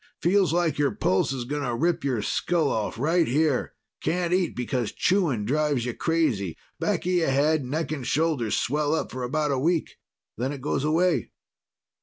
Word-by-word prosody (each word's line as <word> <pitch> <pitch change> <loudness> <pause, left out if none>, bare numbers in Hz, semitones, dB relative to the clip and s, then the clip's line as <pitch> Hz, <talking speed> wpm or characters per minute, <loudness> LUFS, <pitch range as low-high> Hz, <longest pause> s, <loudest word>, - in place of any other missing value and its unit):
Feels 185 0 +3
like 165 -4 +1
your 145 -1 +3
pulse 95 +6 +1
is 130 -2 -3
going 145 +3 -3
to 125 -4 -1
rip 170 +6 0
your 125 -6 0
skull 165 +1 0
off, 110 0 -2
right 165 +6 +2
here. 145 +1 +1 0.3
Can't 175 0 0
eat 180 -1 +1
because 125 -2 -2
chewing 165 - +1
drives 145 -1 +1
you 125 - -2
crazy. 130 - 0 0.2
Back - - -1
of 180 - +1
your 175 -5 +2
head, 145 +2 +2
neck 155 +5 -3
and 140 -5 -4
shoulders 150 -8 +1
swell 150 +3 +1
up - - -3
for 130 - -5
about 145 +4 0
a 135 - 0
week. 165 +3 0 0.4
Then 130 +4 -1
it 140 - -7
goes 140 0 -1
away." 165 +3 +2
150 Hz, 185 wpm, -26 LUFS, 125-165 Hz, 0.4 s, Feels